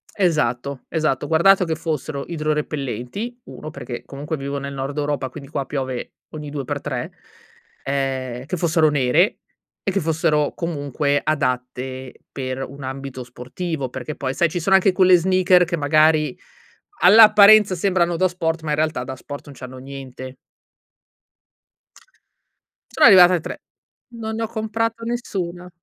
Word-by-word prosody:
Esatto, 140 - 0
esatto. 155 -5 0
Ho - - -6
guardato 185 +4 +4
che 160 -1 -1
fossero 155 -3 -4
idrorepellenti: 150 - -3
1, - - -9
perché, 125 -5 -7
comunque, 145 +3 -5
vivo 140 0 -4
nel 140 0 -5
Nord 135 +2 -5
Europa, 145 -3 -2
quindi 140 +1 -11
qua 140 -2 -3
piove 130 -3 -4 0.2
ogni 150 -1 -8
due 145 -2 -5
per - - -4
tre; - - -4 0.7
ehm, 130 -2 -3
che 180 - -3
fossero 160 -2 +3
nere 145 - +2 0.4
e 195 - 0
che 195 - 0
fossero, 155 -3 +1
comunque, 145 -3 -1
adatte 130 -3 -2 0.2
per 130 -1 -4
un 140 +1 -11
ambito 130 -1 -6
sportivo, 130 +4 -5
perché, 130 +4 -6
poi, 130 -1 -3
sai, 170 +4 +2
ci 175 - -3
sono 195 +4 +3
anche 190 0 +4
quelle 185 0 +5
sneakers 180 0 +4
che, 170 - -1
magari, 155 -1 +3 0.6
all'apparenza 210 0 +7
sembrano 175 -1 +1
da 185 +2 +3
sport, 165 -2 -2
ma, 155 - -3
in - - +2
realtà, 155 -4 0
da 130 +1 -6
sport 145 +2 -9
non 145 - -12
c'hanno 130 0 -9
niente. 130 -1 -9 2.6
Sono 310 - +4
arrivata 185 -4 +8
a - - 0
3. - - -8 0.5
Non 220 -1 -5
ne 225 - -2
ho - - -1
comprato 225 +1 -3
nessuna. 185 -7 -4
150 Hz, 150 wpm, -21 LUFS, 135-180 Hz, 2.6 s, arrivata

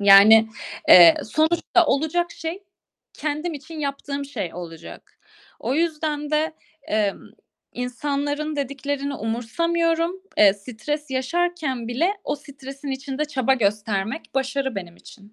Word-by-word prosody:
Yani, 205 +3 +8 0.4
eee, 170 -2 +10
sonuçta 325 +6 +2
olacak 315 +5 +1
şey, 340 +5 -6 0.5
kendim 305 +2 -3
için 315 +3 -9
yaptığım 280 0 -3
şey 230 -12 -5
olacak." 170 -2 -10 0.4
O 260 - -1
yüzden 305 -2 -1
de, 310 +1 +1 0.3
emm, 210 -2 0 0.5
insanların 290 +4 -2
dediklerini 280 +1 -3
umursamıyorum. 330 - -1 0.2
Eee, 205 -2 +7
stres 255 +8 -5
yaşarken 270 -2 -1
bile 300 +11 +1
o - - -1
stresin 275 0 -10
içinde 270 +2 -3
çaba 265 -3 +1
göstermek 210 +4 -1
başarı 270 -1 -1
benim 175 -2 -6
için. 205 +1 -16
280 Hz, 115 wpm, -23 LUFS, 225-310 Hz, 0.5 s, eee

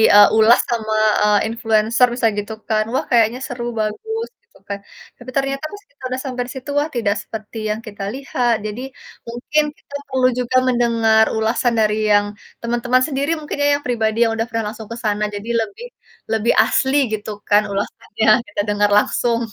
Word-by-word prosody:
eee, 205 0 +9
ulas 220 +2 +6
sama, 220 -2 -1 0.3
eee, 210 -1 +4
influencer 225 +1 +2
bisa 240 -2 +1
gitu 205 +2 -3 0.2
kan, 215 0 +2
wah 265 - 0
kayaknya 235 +1 +3
seru 240 -1 -6 0.2
bagus 445 - -3
gitu - - -25
kan. 200 0 -4 0.4
Tapi 245 +1 -11
ternyata 275 +1 -1
pas 410 0 -11
kita 285 - -35
udah 255 +1 -3
sampai 250 -1 -3
situ 265 +2 -8
wah 300 - -1
tidak 210 -3 +1
seperti 220 0 -8
yang 210 - -1
kita 205 -2 -7
lihat, 255 -3 0
jadi 215 +4 -5 0.5
mungkin 265 +6 0
kita 285 - -12
perlu 260 -1 +2
juga 250 +1 +1
mendengar 230 -3 +3
ulasan 230 +2 +1
dari 210 -1 +2 0.2
yang 205 0 +4 0.4
teman-teman 240 +2 +1
sendiri 280 +2 -1
mungkin 300 -1 -6
ya, 285 - +3
yang 290 - -14
pribadi 225 -3 0
yang 225 - +1
udah 225 0 -1
pernah 225 0 -2
langsung 220 -2 -10
ke 230 - -5
sana 210 -1 0
jadi 210 +3 -7
lebih 225 - -6 0.5
lebih 225 +1 +2
asli 265 +2 +1 0.2
gitu 215 0 -4 0.2
kan 205 +1 +6
ulasannya 205 +2 -3 0.2
kita 205 - -2
dengar 205 0 +2
langsung. 235 +2 +1
230 Hz, 180 wpm, -19 LUFS, 215-255 Hz, 0.5 s, eee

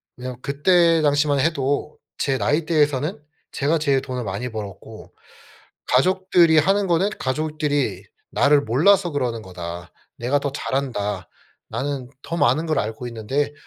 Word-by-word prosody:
그냥 125 0 -7
그때 165 +4 +3
당시만 145 -1 +2
해도 145 0 0 0.2
제 135 -2 0
나이대에서는 150 0 +1 0.3
제가 150 +4 +1
제일 140 -3 +1
돈을 130 -2 -4
많이 100 +5 -4
벌었고 110 0 -9 0.8
가족들이 175 +3 +4
하는 195 +5 +3
거는 180 +4 +2
"가족들이 150 +1 -1 0.3
나를 145 0 +4
몰라서 175 - +3
그러는 125 -6 -2
거다. 85 -2 -8 0.2
내가 125 +4 0
더 140 0 -3
잘 135 - -4
안다. 105 -8 -2 0.4
나는 135 -2 -3
더 170 - -4
많은 150 +4 +2
걸 155 - 0
알고 110 +3 -3
있는데 120 +6 -2
140 Hz, 290 characters per minute, -22 LUFS, 125-155 Hz, 0.8 s, 가족들이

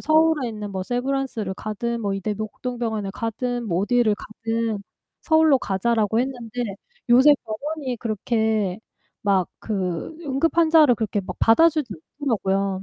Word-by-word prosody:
서울에 315 -4 +3
있는 210 -2 -6
뭐 190 -1 -3
세브란스를 245 -3 -2
가든, 230 +4 -3
뭐 200 -3 -1
이대 210 +2 -2
목동 220 +4 -5
병원을 220 -4 -2
가든, 240 +2 -3
뭐 175 -3 0
어디를 235 -1 +3
가든 225 -1 -3 0.4
서울로 315 -3 +4
가자."라고 220 +1 0
했는데 245 -2 -3 0.5
요새 260 +5 +7
병원이 265 +4 -4
그렇게 220 -3 0 0.4
막 195 -3 +2
그 190 - -3
응급환자를 315 0 +4
그렇게 210 -2 -1
막 185 - -7
받아주지 295 0 +4 0.3
않더라고요. 195 -6 0
230 Hz, 315 characters per minute, -23 LUFS, 205-260 Hz, 0.5 s, 요새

